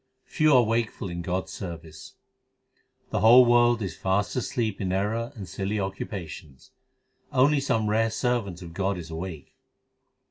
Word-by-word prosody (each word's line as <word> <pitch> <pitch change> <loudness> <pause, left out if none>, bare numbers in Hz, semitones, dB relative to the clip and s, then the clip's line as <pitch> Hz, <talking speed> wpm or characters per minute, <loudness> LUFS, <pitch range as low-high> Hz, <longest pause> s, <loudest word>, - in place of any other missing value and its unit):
Few 155 0 +2
are 125 - +6
wakeful 110 -3 -1
in 85 0 -4
God 90 +2 -2
s - - -13
service: 80 -4 -9 1.0
The - - 0
whole 120 +3 +8
world 120 -1 +4
is 90 -5 -5
fast 100 +2 -1
asleep 120 -5 -2
in 95 -2 -1
error 110 +6 -1
and 100 -5 -8
silly 95 +4 -3
occupa 95 -2 -4
tions; 75 -5 -12 0.6
Only 140 +3 +4
some 115 -6 0
rare 110 +2 +2
servant 110 -7 -2
of 85 -1 -10
God 95 +1 -1
is 85 -2 -8
awake. 80 -2 -7
100 Hz, 155 wpm, -26 LUFS, 90-115 Hz, 1.0 s, whole